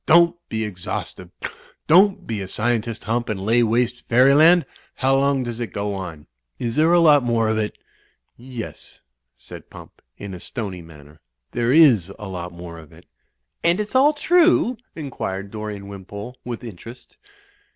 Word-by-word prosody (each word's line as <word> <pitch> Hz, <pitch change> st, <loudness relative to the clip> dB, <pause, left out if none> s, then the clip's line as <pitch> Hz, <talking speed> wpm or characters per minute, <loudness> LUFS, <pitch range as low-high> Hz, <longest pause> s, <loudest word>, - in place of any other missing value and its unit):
"Don't 170 Hz, +1 st, +6 dB
be 110 Hz, 0 st, -2 dB
exhaustive! 90 Hz, -4 st, -6 dB, 0.6 s
Don't 190 Hz, +5 st, +4 dB
be 110 Hz, -3 st, -3 dB
a 95 Hz, -, -5 dB
scientist. 115 Hz, +2 st, -2 dB
Hump, 120 Hz, +1 st, -1 dB
and 105 Hz, -3 st, -2 dB
lay 115 Hz, +3 st, +3 dB
waste 120 Hz, +2 st, +1 dB
fairyland! 145 Hz, +8 st, +6 dB, 0.3 s
How 135 Hz, +1 st, +2 dB
long 135 Hz, -1 st, +2 dB
does 120 Hz, -1 st, -5 dB
it 120 Hz, -, -4 dB
go 100 Hz, 0 st, -2 dB
on? 85 Hz, -6 st, -7 dB, 0.3 s
Is 115 Hz, -1 st, -3 dB
there 160 Hz, +2 st, +4 dB
a 175 Hz, -, +6 dB
lot 150 Hz, -4 st, +6 dB
more 115 Hz, -2 st, +1 dB
of 110 Hz, 0 st, 0 dB
it?" 105 Hz, -1 st, -3 dB, 0.6 s
''Yes," 120 Hz, -2 st, -9 dB, 0.4 s
said -, -, -12 dB
Pump, -, -, -14 dB, 0.2 s
in 100 Hz, -2 st, -7 dB
a 90 Hz, -, -8 dB
stony 100 Hz, -4 st, -6 dB
manner. 75 Hz, -2 st, -15 dB, 0.3 s
"There 120 Hz, 0 st, 0 dB
is 130 Hz, -, +5 dB
a 105 Hz, -, -8 dB
lot 90 Hz, -2 st, -6 dB
more 85 Hz, -1 st, -9 dB
of 80 Hz, -3 st, -15 dB
it." -, -, -17 dB, 0.6 s
"And 170 Hz, +3 st, +3 dB
it's 210 Hz, 0 st, -4 dB
all 275 Hz, +4 st, +5 dB
true?" 335 Hz, -4 st, +3 dB, 0.2 s
inquired 100 Hz, -10 st, -5 dB
Dorian 105 Hz, -2 st, -6 dB
Wimpole, 100 Hz, +4 st, -8 dB
with 120 Hz, 0 st, -6 dB
interest. 115 Hz, +2 st, -11 dB
115 Hz, 160 wpm, -22 LUFS, 100-140 Hz, 0.6 s, Don't